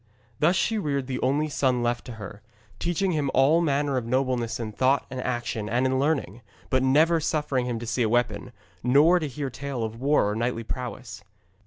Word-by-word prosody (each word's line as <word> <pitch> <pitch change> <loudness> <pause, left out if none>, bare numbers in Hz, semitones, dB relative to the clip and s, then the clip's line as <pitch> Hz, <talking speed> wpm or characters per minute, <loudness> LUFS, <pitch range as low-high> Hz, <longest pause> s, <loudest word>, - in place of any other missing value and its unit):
Thus 170 +5 +3
she 220 +3 +1
reared 140 -7 -1
the 130 -1 -4
only 145 +4 +1
son 130 -4 0
left 120 0 -1
to 125 - -7
her, 105 -1 -9 0.4
teaching 175 +2 0
him 150 -4 0
all 145 +6 +4
manner 145 -3 +1
of 125 - -2
nobleness 125 -2 0
in 110 -2 -4
thought 130 +5 +2
and 130 -1 -4
action 120 -4 -3
and 120 +3 +1
in 130 0 +1
learning, 135 - -1 0.3
but 130 - +3
never 155 +6 +4
suffering 150 -5 -1
him 120 -2 -2
to 115 - -6
see 115 +2 -1
a 110 - +2
weapon, 120 0 0 0.3
nor 145 +8 +5
to 155 - -3
hear 140 +1 -4
a - - -16
tale 140 -3 -4
of 110 +2 -5
war 140 -5 +3
or - - -3
knightly 115 0 -1
prowess. 125 -3 -6
130 Hz, 205 wpm, -26 LUFS, 120-145 Hz, 0.4 s, nor